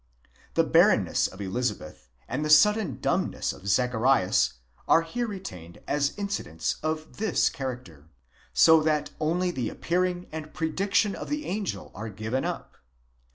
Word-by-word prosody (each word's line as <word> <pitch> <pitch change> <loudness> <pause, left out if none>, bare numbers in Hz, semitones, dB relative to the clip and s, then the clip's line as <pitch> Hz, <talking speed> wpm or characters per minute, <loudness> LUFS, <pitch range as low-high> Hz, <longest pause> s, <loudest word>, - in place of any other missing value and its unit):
The - - +4
barrenness - - +4
of 95 - -11
Elizabeth 100 - -4 0.2
and 150 - -2
the 150 - -2
sudden 210 +6 +4
dumbness - - -1
of 100 - -12
Zacharias 125 -1 +2 0.3
are 165 - +5
here 240 +9 -3
re 200 -3 -5
tained 85 - -10
as 145 +3 0
incidents 200 - -3
of 155 0 -4
this 215 -5 +2
character: 120 - -7 0.4
so 160 -1 +6
that 155 -1 0
only 175 +4 0
the 125 -8 -2
appearing 180 0 -1
and 155 -1 -7
predic 185 +5 -2
tion 205 -2 +4
of - - -7
the 295 0 -2
angel 200 +1 -4
are 110 +2 -6
given 110 +6 -3
up. - - -5
155 Hz, 150 wpm, -27 LUFS, 115-185 Hz, 0.4 s, so